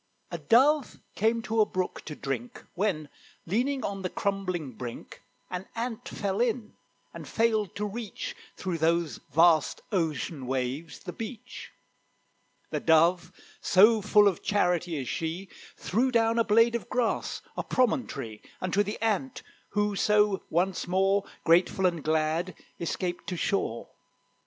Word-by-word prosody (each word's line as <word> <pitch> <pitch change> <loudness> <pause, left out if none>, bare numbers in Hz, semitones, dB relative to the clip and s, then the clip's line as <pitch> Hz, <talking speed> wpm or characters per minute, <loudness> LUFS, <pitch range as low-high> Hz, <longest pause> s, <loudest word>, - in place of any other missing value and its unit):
A - - -4
Dove 275 +4 +3 0.2
came 225 +2 +1
to 220 0 +1
a - - +5
brook 185 -1 -3
to 150 - -6
drink, 130 -4 -5
When, 175 -6 -1 0.4
leaning 255 +9 0
on 195 -1 -3
the 185 - -2
crumbling 185 -8 -2
brink, 120 0 -8 0.3
An 180 +1 -4
Ant 230 -1 -4
fell 200 +1 -2
in, 235 -2 -1 0.4
and - - -9
failed 220 -4 +1
to 210 - -2
reach, 215 +1 -5 0.2
Through 180 -3 -3
those 165 -4 +1
vast 165 +1 +4
ocean 155 - -2
waves, 135 +5 -3
the - - -7
beach. 225 0 -8 1.0
The - - -1
Dove, 165 +2 +3 0.3
so 215 +4 +6
full 205 +1 +5
of 190 -5 0
charity 180 -4 +1
is 130 -3 -4
she, 165 +7 -3 0.3
Threw 240 +7 +1
down 230 -1 +3
a - - +5
blade 230 +2 +4
of 235 - -3
grass, 245 -2 -1
a - - -2
promontory, 140 - -1 0.2
Unto 185 +2 +1
the 205 +1 -3
Ant, 225 +4 -1 0.3
who 205 0 0
so 210 -1 +3
once 180 +3 0
more, 195 +2 +2 0.2
Grateful 180 +3 +3
and 170 -4 +1
glad, 160 +3 0 0.2
escaped 175 +1 -3
to 180 0 -3
shore. 165 - -1
190 Hz, 140 wpm, -28 LUFS, 165-220 Hz, 1.0 s, so